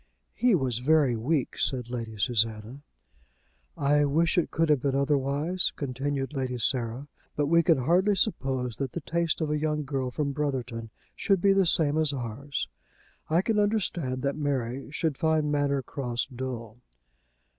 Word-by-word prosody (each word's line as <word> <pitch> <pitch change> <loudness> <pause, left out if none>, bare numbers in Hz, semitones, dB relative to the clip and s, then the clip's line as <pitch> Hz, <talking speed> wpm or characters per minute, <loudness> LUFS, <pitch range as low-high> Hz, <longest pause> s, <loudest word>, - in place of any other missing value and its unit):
"He 245 -4 +3
was 130 -7 0
very 140 -2 +3
weak," 130 +5 -1
said 125 -3 0
Lady 115 -3 -5
Susanna. 115 +3 -1 1.0
"I 145 +1 +3
wish 160 +4 +2
it 175 - +2
could 165 0 +1
have 145 -4 +3
been 135 0 0
otherwise," 145 +5 +1
continued 135 +1 -3
Lady 130 -3 -2
Sarah; 120 +2 -1 0.3
"but 145 - +1
we 170 +3 +4
can 165 -2 +4
hardly 180 +10 +3
suppose 130 - -1
that 135 -3 -3
the 170 - -4
tastes 170 +1 -1
of 155 -1 0
a 150 - 0
young 150 0 -1
girl 135 -2 -2
from 140 +3 -2
Brotherton 130 -6 -3 0.3
should 195 -3 +2
be 195 +2 +4
the 195 -2 +3
same 155 -2 +3
as 155 -2 +3
ours. 130 +3 -4 0.6
I 165 +4 +3
can 220 -1 +1
understand 175 -11 0
that 140 0 0
Mary 135 -3 -2
should 155 -2 -2
find 155 -2 +2
Manor 140 -2 +1
Cross 125 -1 -3
dull." 120 -3 -5
140 Hz, 160 wpm, -27 LUFS, 125-155 Hz, 1.0 s, we